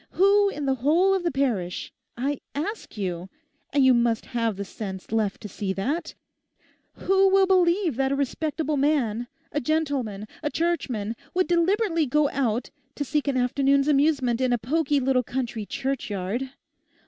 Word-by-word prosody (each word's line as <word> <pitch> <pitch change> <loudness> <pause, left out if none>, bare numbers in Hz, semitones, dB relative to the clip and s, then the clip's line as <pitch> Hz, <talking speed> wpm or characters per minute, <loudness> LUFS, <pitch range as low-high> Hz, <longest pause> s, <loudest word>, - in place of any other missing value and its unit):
Who 400 +2 +4
in 295 -7 -4
the 270 - +2
whole 340 +8 +4
of 385 - +1
the 345 - 0
parish—I 255 - -3 0.2
ask 320 - -4
you—and 205 - -3
you 260 - +7
must 235 -2 +1
have 230 -3 -1
the 200 +1 -5
sense 190 -1 -7
left 215 -3 0
to 210 - -6
see 195 -1 -3
that—who 335 - -2
will 385 0 +5
believe 360 - +2
that 270 0 +1
a - - +2
respectable 300 +2 -1
man, 250 -5 +1 0.2
a 295 - -1
gentleman, 265 -9 -1
a 300 - -1
Churchman, 255 -11 -1 0.2
would 370 0 +2
deliberately 345 -1 +2
go 295 +2 +2
out 245 -3 -1 0.2
to 285 - -3
seek 295 +1 -1
an 275 -2 +1
afternoon's 275 +3 +2
amusement 275 -4 +2
in 255 -1 +2
a 245 - +3
poky 290 +5 +1
little 260 -1 +2
country 240 -3 -4
churchyard? 260 -4 -3
275 Hz, 150 wpm, -25 LUFS, 235-320 Hz, 0.2 s, you